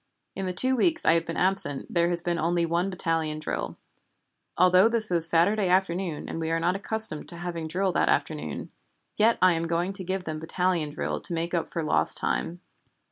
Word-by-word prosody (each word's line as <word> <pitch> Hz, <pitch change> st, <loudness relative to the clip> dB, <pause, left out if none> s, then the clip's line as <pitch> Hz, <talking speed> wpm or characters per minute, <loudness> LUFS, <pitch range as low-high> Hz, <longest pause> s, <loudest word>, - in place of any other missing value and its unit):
In 195 Hz, -1 st, -3 dB
the -, -, -1 dB
two 255 Hz, +9 st, +1 dB
weeks 330 Hz, +6 st, +1 dB
I -, -, +6 dB
have 165 Hz, 0 st, 0 dB
been 165 Hz, -, -4 dB
absent 185 Hz, -7 st, +2 dB
there 170 Hz, 0 st, +2 dB
has 175 Hz, 0 st, -1 dB
been 170 Hz, -1 st, -1 dB
only 170 Hz, +1 st, +1 dB
one 170 Hz, +3 st, 0 dB
battalion 165 Hz, -4 st, -1 dB
drill. 155 Hz, -, -4 dB, 0.8 s
Although 185 Hz, +4 st, +5 dB
this 225 Hz, -4 st, 0 dB
is 170 Hz, -1 st, +1 dB
Saturday 190 Hz, +5 st, +3 dB
afternoon 180 Hz, -3 st, 0 dB
and -, -, -5 dB
we 160 Hz, 0 st, -2 dB
are 165 Hz, 0 st, +1 dB
not 175 Hz, +3 st, +1 dB
accustomed 220 Hz, -4 st, -1 dB
to 170 Hz, -, -7 dB
having 170 Hz, -2 st, -4 dB
drill 185 Hz, +4 st, 0 dB
that -, -, +1 dB
afternoon, -, -, -2 dB, 0.5 s
yet 225 Hz, +2 st, +4 dB
I 185 Hz, -1 st, +6 dB
am 165 Hz, 0 st, -2 dB
going 170 Hz, +3 st, -1 dB
to 195 Hz, -1 st, -7 dB
give 185 Hz, +1 st, -3 dB
them 155 Hz, -2 st, -5 dB
battalion 170 Hz, -1 st, -1 dB
drill 145 Hz, -, -3 dB
to -, -, -3 dB
make 170 Hz, +1 st, -2 dB
up 170 Hz, -2 st, -1 dB
for 165 Hz, -, -2 dB
lost 80 Hz, -, +1 dB
time. 175 Hz, +1 st, -1 dB
175 Hz, 205 wpm, -26 LUFS, 165-190 Hz, 0.8 s, I